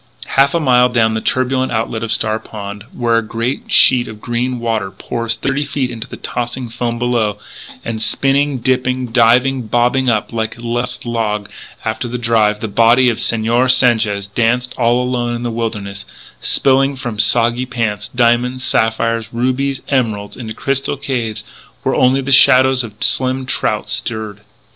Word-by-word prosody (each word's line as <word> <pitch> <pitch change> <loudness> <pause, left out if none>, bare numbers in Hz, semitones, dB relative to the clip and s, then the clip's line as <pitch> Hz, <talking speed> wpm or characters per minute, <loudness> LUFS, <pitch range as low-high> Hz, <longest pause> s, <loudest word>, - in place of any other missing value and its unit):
Half 140 +3 +3
a - - +2
mile 125 -4 +4
down 115 -2 +2
the 110 - -2
turbulent 130 +1 0
outlet 110 -1 -2
of 115 - -3
Star 110 0 0
Pond, 105 -1 -8
where 115 -2 +1
a - - -4
great 115 +4 -4
sheet 125 -1 +5
of 110 -1 -9
green 125 +2 -2
water 110 -4 -2
pours 115 +3 -3
thirty 135 +5 -1
feet 135 -3 -3
into 115 0 -7
the - - -9
tossing 120 0 -4
foam 120 0 -3
below, 115 -4 0 0.5
and 110 -1 -4
spinning, 140 +3 +1
dipping, 125 0 -1
diving, 125 +1 +3
bobbing 125 +3 +1
up 110 0 -1
like 110 0 -3
a - - -12
lost 120 +2 -3
log 110 -3 -2 0.3
after 110 +2 -2
the 120 +1 -4
drive, 110 -3 +1
the 110 - -2
body 115 +4 +4
of 110 - -5
Señor 115 +3 +1
Sanchez 110 -6 +3
danced 120 +4 0
all 120 +1 +2
alone 120 -1 -2
in 120 - -5
the 120 - -2
wilderness, 105 -4 -4 0.4
spilling 135 +1 +2
from 120 -5 -6
soggy 120 +3 +4
pockets 115 -5 -3
diamonds, 125 +1 +1
sapphires, 115 -1 0
rubies, 130 +3 -1
emeralds, 110 -7 -1
into 110 -3 -7
crystal 135 +1 -1
caves 115 -6 -3 0.4
where - - 0
only 130 +2 +3
the 135 +1 -4
shadows 130 -1 +5
of 110 -3 -8
slim 130 0 +1
trout - - -1
stirred. 110 -2 -3
120 Hz, 165 wpm, -16 LUFS, 110-130 Hz, 0.5 s, sheet